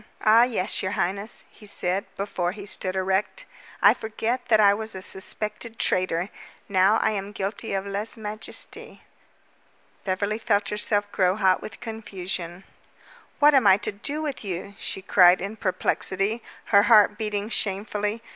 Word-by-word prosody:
"Ah, 220 +2 +7
yes, 225 -5 +1
your 190 +1 -2
highness," 200 +5 -3
he 210 - -12
said, 190 -1 0
before 185 -3 -2
he 200 -1 -9
stood 190 -2 -3
erect. 190 - -1 0.4
"I - - +8
forget 230 +3 -3
that 220 -2 +4
I 200 -1 +6
was 220 +1 -5
a 190 - -6
suspected 215 +4 -4
traitor. 185 -2 0 0.4
Now 195 +1 +4
I 220 - +2
am 200 -1 -4
guilty 200 +2 -3
of 195 0 -2
lese 200 +3 -3
majeste." 215 0 -4 1.1
Beverly 200 +3 -1
felt 205 -2 +1
herself 205 -1 0
grow 185 -1 +2
hot 190 -3 +2
with 200 - -9
confusion. 190 -5 -5 0.7
"What 295 0 +6
am 260 -7 +5
I 190 0 +7
to - - -3
do 280 +10 -4
with 290 -6 -4
you?" 195 0 -5
she 190 - -5
cried 180 -1 +6
in 200 +4 -5
perplexity, 195 +2 -1 0.3
her 200 - +8
heart 210 -1 +5
beating 210 -1 -2
shamefully. 210 +1 -2
205 Hz, 155 wpm, -25 LUFS, 190-220 Hz, 1.1 s, I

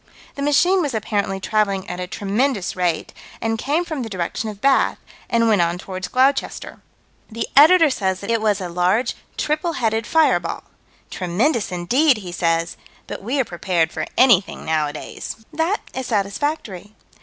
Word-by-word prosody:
"The 280 - -7
machine 350 +7 +3
was 285 -7 -2
apparently 205 -3 -1
traveling 200 -2 0
at 180 0 -5
a 180 - -4
tremendous 205 +3 -1
rate, 175 -3 -1 0.3
and 225 0 -1
came 305 +8 0
from 315 -5 -4
the 230 - -5
direction 190 +3 -3
of 205 -2 -9
Bath, 275 +4 +3 0.3
and 230 -1 +2
went 210 -5 +4
on 170 +1 0
toward 185 0 -6
Gloucester." 265 +2 0 0.5
The 230 0 -4
Editor 320 +2 +7
says 190 -6 -1
that 200 +3 -3
it 230 -1 +1
was 210 -2 +1
a 185 - -4
large, 180 +7 +1 0.2
triple 310 +3 -1
headed 225 -4 -1
fireball. 320 -1 +2 0.5
"Tremendous 205 - 0
indeed!" 245 - +2
he 185 -4 -7
says. 165 -1 0 0.3
"But - - -7
we 250 +8 -2
are 260 - +2
prepared 175 -3 0
for - - -4
anything 235 -7 +3
nowadays." 155 -2 -3 0.2
That 325 +7 0
is 260 -1 -4
satisfactory. 205 - -2
215 Hz, 160 wpm, -21 LUFS, 185-270 Hz, 0.5 s, Editor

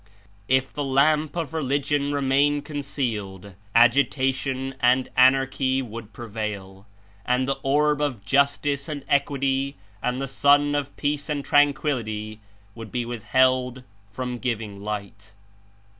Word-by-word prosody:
If 130 0 +1
the 145 - -3
lamp 145 +3 +2
of 165 -3 -3
Religion 145 -1 0
remain 145 +1 +2
con 150 -1 -7
cealed, 105 -9 -4 0.2
agitation 130 +2 +2
and 125 +1 +3
anarchy 130 0 +3
would 115 -2 -9
prevail, 105 -3 -6 0.4
and 125 +1 +1
the 135 - -1
orb 150 +2 +2
of 125 -9 -2
justice 140 +2 +1
and 145 -3 -5
equity 140 -1 0 0.3
and 125 +1 -1
the 135 - -3
sun 145 +2 +3
of 145 -1 -3
peace 145 +1 -2
and 145 -2 -2
tranquillity 125 -7 +1 0.3
would 115 -1 -10
be 120 -1 -2
withheld 125 +2 +1 0.3
from 125 +3 -4
giving 110 -5 -3
light. 100 0 -6
130 Hz, 125 wpm, -24 LUFS, 115-140 Hz, 0.4 s, and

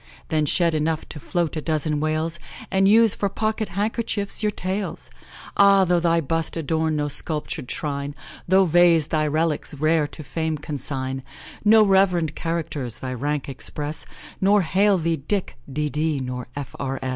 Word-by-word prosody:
Then 155 -1 +1
shed 170 +2 +2
enough 155 +1 -1
to 150 - -7
float 170 +2 -1
a 155 - -2
dozen 155 -1 0
whales, 155 +2 -1 0.3
And 195 0 +3
use 220 0 +6
for 200 - -1
pocket 215 +1 -2
handkerchiefs 205 +1 -1
your 210 - +2
tails! 195 0 -4 0.4
Ah! 200 -1 +6
though 175 -1 +3
thy 170 0 +2
bust 165 +3 -2
adorn 160 0 0
no 150 -1 0
sculptur'd 150 -3 -1
shrine, 140 -1 -3 0.3
No 190 +2 +5
vase 170 -2 +5
thy 155 -2 +1
relics 155 0 0
rare 155 +1 +2
to 155 - -10
fame 160 +2 -2
consign; 135 -2 -4 0.4
No 215 0 +6
rev'rend 180 -5 +3
characters 155 -7 -3
thy 130 -1 -5
rank 145 +3 -2
express, 145 +3 -4 0.3
Nor 200 +1 +4
hail 195 +4 +3
thee, 165 -1 0
Dick, 185 +7 -2 0.2
'D.D. 150 +1 -1
nor 125 -1 -5
F.R. 135 -1 -4
160 Hz, 155 wpm, -23 LUFS, 150-190 Hz, 0.4 s, use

